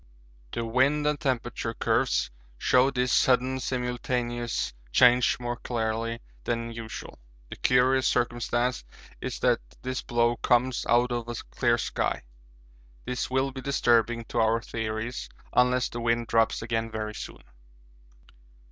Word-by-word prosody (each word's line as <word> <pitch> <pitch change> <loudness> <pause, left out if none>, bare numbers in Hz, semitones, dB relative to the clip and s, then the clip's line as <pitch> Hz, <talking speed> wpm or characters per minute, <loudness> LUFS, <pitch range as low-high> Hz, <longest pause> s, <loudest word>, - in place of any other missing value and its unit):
The 115 - -2
wind 135 +6 +2
and 150 -1 +1
temperature 120 -3 -2
curves - - +1 0.3
show 125 - +4
this 125 -2 0
sudden 130 +1 +3
simultaneous 125 - -2 0.2
change 125 - +5
more 120 0 -3
clearly 115 -1 -2 0.2
than 115 -1 -2
usual. 115 - -8 0.3
The - - -7
curious 130 +1 +3
circumstance 120 - 0 0.4
is - - -4
that - - +3 0.2
this 130 -1 -2
blow 120 0 +1
comes 125 +1 +1
out 120 +1 +4
of 120 -1 -3
a 120 - -3 0.2
clear 120 -1 +2
sky. 110 - -2 0.8
This 125 0 -2
will 130 +1 +1
be 130 0 -7
disturbing 120 -3 +2
to 120 - -1
our 115 +1 +3
theories 115 +2 -4 0.2
unless 125 0 +3
the 120 - -6
wind 115 0 +1
drops 115 0 +2
again 115 -1 -1
very 110 -1 -4
soon. - - -8
120 Hz, 130 wpm, -27 LUFS, 115-125 Hz, 0.8 s, change